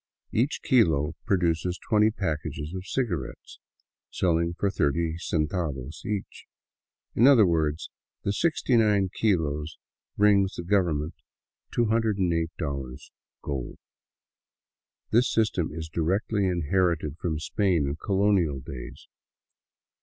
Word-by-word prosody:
Each 125 +7 0
kilo 80 - +3
produces 90 -1 +1
twenty 105 0 +2
packages 80 -5 -4
of 95 0 -6
cigarettes, 90 - -4 0.5
selling 85 -1 0
for 100 - 0
thirty 80 +1 0
centavos 75 -4 -2
each; 100 -2 -5 0.7
in 120 - +5
other 125 -7 +7
words 80 -3 0 0.3
the 100 - 0
69 110 - +2
kilos 80 -7 0 0.4
bring 100 -1 +5
the 85 - -4
government 85 -5 +1 0.6
$208 85 - -1 0.3
gold. 65 -4 -4 1.3
This 120 +3 +3
system 105 -7 +1
is 80 +1 -6
directly 95 +5 0
inherited 85 -3 0
from 80 -3 -2
Spain 90 0 +1
and 70 +3 -3
colonial 95 -7 +1
days. 65 -1 -9
85 Hz, 100 wpm, -26 LUFS, 75-100 Hz, 1.3 s, other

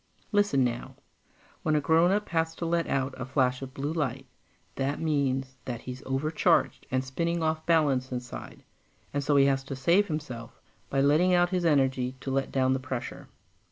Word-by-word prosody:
Listen 205 - +3
now. 120 -1 -3 0.7
When 155 - +1
a - - +4
grownup 175 +7 +3
has 165 -1 0
to 170 - -4
let 170 0 0
out 135 0 -1
a 130 - -4
flash 130 -1 +1
of 130 -1 -8
blue 145 +3 -2
light, 135 -4 -2 0.5
that 140 +1 -2
means 135 -4 -1
that 120 -2 -4
he's 125 0 -7
overcharged 150 +4 +1
and 130 0 0
spinning 170 +5 -1
off 155 0 -1
balance 140 -6 +2
inside, 125 -1 -7 0.5
and 145 0 -1
so 145 +1 +2
he 140 -1 +6
has 135 -1 +2
to 135 - -5
save 170 +10 +3
himself 130 -7 -6 0.3
by 135 - +1
letting 160 +6 +4
out 175 +1 +3
his 180 -2 0
energy 130 -4 +2
to 135 - -4
let 135 0 -1
down 130 -1 +2
the 130 - 0
pressure. 130 -2 -6
140 Hz, 180 wpm, -28 LUFS, 130-160 Hz, 0.7 s, he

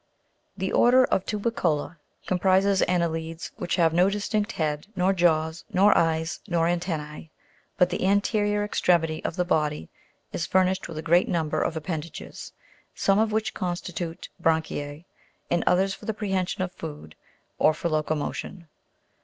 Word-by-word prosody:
16. - - -2
The - - -5
ORDER 255 +2 +6
OF 190 - 0
TUBICOLA 180 -8 -1 0.3
comprises 190 +1 +3
anne'lides 165 -2 -2
which 175 - -1
have 165 -2 +3
no 180 +3 +4
distinct 210 +2 -1
head, 150 0 -2
nor 185 +2 +2
jaws, 160 -2 +1
nor 200 +3 +5
eyes, 160 0 +1
nor 170 -1 +1
antennae, 160 -3 -3 0.5
but 180 0 +3
the 180 - -2
anterior 205 +1 +2
extremity 170 -6 +1
of - - -3
the 180 - 0
body 150 - 0 0.4
is 160 - -2
furnished 185 0 +2
with 160 - -8
a 155 - -4
great 175 +3 +3
number 160 -3 0
of 165 - -1
ap 155 - -5
pendages, 160 -1 -6 0.4
some 195 +1 +2
of 220 0 +2
which 220 0 -1
constitute 175 -2 -4
bran'chise, 160 -2 -1 0.5
and 175 - +2
others 190 +2 +3
for - - -11
the 220 - -2
prehension 190 -2 -1
of 180 - -4
food, 150 - -8 0.5
or 155 - +5
for 155 +2 -3
locomotion. 155 +2 -3
175 Hz, 155 wpm, -26 LUFS, 160-195 Hz, 0.5 s, ORDER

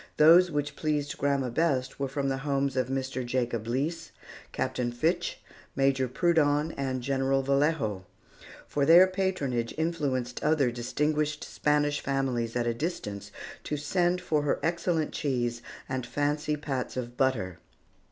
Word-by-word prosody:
Those 170 +4 +7
which 145 -2 -2
pleased 150 -2 -2
grandma 140 -3 +1
best 135 -3 0
were 140 - 0
from 135 +1 -2
the 135 0 -1
homes 140 -1 0
of 130 -2 +1
Mr. 130 0 -2
Jacob 120 -2 -2
Leese, 145 +8 -2 0.4
Captain 120 -1 -2
Fitch, 170 +8 -1 0.4
Major 135 -1 +2
Prudon, 150 +1 +2
and 130 -2 -2
General 135 0 +1
Vallejo; 135 - 0 0.6
for 145 - -1
their 170 +5 +8
patronage 185 -11 -1
influenced 140 -7 -1
other 150 -5 +3
distinguished 150 +5 -1
Spanish 145 0 0
families 130 -4 -1
at 120 -1 0
a 120 - +1
distance 105 - -4 0.3
to 150 - -3
send 175 +4 +1
for 155 -4 +1
her 145 - 0
excellent 170 -1 0
cheese 120 -4 -1 0.3
and 130 -1 -2
fancy 145 +4 -1
pats 135 -4 -4
of 120 -1 -4
butter. 115 -10 0
140 Hz, 140 wpm, -28 LUFS, 125-150 Hz, 0.6 s, their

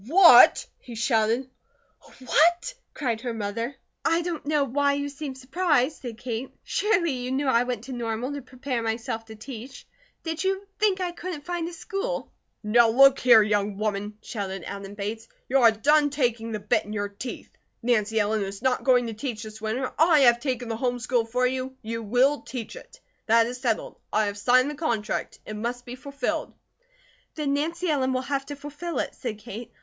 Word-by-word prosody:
"What?" 345 +4 +8
he 240 - -10
shouted. 230 +2 +1 0.8
"What?" 345 - +3 0.2
cried 235 -6 -2
her 240 -2 -3
mother. 230 +5 -3 0.3
"I 330 +1 +2
don't 330 -4 -4
know 300 -1 +2
why 280 +2 +1
you 285 0 -2
seem 280 -1 -6
surprised," 280 +1 0
said 235 -4 -6
Kate. 240 +1 -4
"Surely 400 -6 +1
you 250 -1 -4
knew 275 +2 0
I 240 -3 +4
went 245 -3 -3
to 265 - -8
Normal 240 +2 -3
to 285 - -5
prepare 255 -1 -4
myself 225 0 -3
to 220 -1 -11
teach. 245 +3 -9 0.4
Did 325 +1 -3
you 385 +1 -1
think 410 -3 +2
I 360 -1 -1
couldn't 345 -4 -7
find 345 -1 -2
a - - -10
school?" 390 +8 -4 0.3
"Now 230 +2 +5
look 275 +3 +6
here, 235 -3 +7
young 205 -1 0
woman," 210 0 -2
shouted 195 -3 -5
Adam 200 0 -7
Bates, 215 +3 -5 0.2
"you 270 +2 +3
are 235 -3 +7
done 290 +7 +3
taking 240 -5 -1
the 215 - -3
bit 205 - +1
in 210 - -8
your 205 -1 -1
teeth. 220 +5 -8 0.3
Nancy 220 -2 +2
Ellen 210 +1 +1
is 195 +2 -5
not 260 -1 +1
going 250 -2 +4
to 225 - -4
teach 225 0 -5
this 215 0 -10
winter. 245 +4 -2
I 320 -2 +6
have 240 -2 +6
taken 250 -2 -2
the 225 -1 -3
home 245 -1 0
school 245 -1 0
for 250 +2 0
you; 260 +1 -2
you 230 +1 -4
will 250 +7 +2
teach 240 -4 -7
it. - - -13 0.3
That 230 0 +5
is 250 +2 -6
settled. 235 -4 -2
I 215 - +2
have 205 0 -3
signed 255 +6 +4
the 295 +1 -10
contract. 225 -8 -2
It 215 - -6
must 240 +3 -4
be 245 - -7
fulfilled." 280 +2 -3 0.8
"Then 295 -3 -1
Nancy 335 +5 -1
Ellen 265 -4 +1
will 255 - 0
have 275 +1 -3
to 290 - -5
fulfill 295 +4 -6
it," - - -2
said 230 -4 -5
Kate. 225 +1 -9
250 Hz, 195 wpm, -26 LUFS, 225-285 Hz, 0.8 s, What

